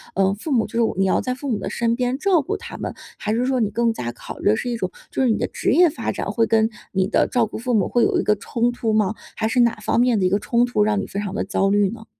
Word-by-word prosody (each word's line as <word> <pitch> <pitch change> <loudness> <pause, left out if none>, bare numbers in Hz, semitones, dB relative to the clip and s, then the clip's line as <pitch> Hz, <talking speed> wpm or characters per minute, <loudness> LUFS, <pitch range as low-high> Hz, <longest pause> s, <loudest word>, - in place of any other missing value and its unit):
呃， 195 0 +2
父 255 +9 -6
母 235 -5 +2
就 - - -17
是 195 - -3
你 195 - +3
要 190 - +2
在 255 - -2
父 270 +2 -6
母 225 - 0
的 - - -4
身 235 0 0
边 250 +1 -1
照 365 0 +3
顾 275 - -3
他 - - -9
们， - - -4 0.2
还 215 - -2
是 240 +3 +1
说 260 -1 +1
你 215 - +1
更 230 +2 +1
加 120 - -4
考 120 - -10
虑 - - +2
的 215 - +4
是 245 +3 -3
一 235 - -2
种 185 -4 -3 0.2
就 - - -1
是 255 - +3
你 220 - +2
的 - - -1
职 - - -1
业 345 +5 +6
发 310 - -3
展 - - -4
会 230 - +2
跟 220 0 +2 0.2
你 190 -1 +1
的 - - +2
照 245 -2 +2
顾 - - -7
父 245 +2 -2
母 205 -5 +2
会 240 - +2
有 - - +2
一 - - 0
个 210 - +3
冲 235 +4 -1
突 225 -2 -2
吗？ 215 0 +1 0.2
还 220 - -1
是 245 +3 0
哪 235 -1 +3
方 215 +2 -1
面 245 -3 +3
的 185 - +1
一 - - +3
个 200 +2 +1
冲 235 +3 +2
突 215 -4 +1
让 210 -1 +1
你 - - -4
非 200 - -4
常 205 -2 -4
地 205 - -1
焦 195 0 0
虑 205 -1 +3
呢？ 220 +1 -9
225 Hz, 345 characters per minute, -22 LUFS, 205-245 Hz, 0.2 s, 业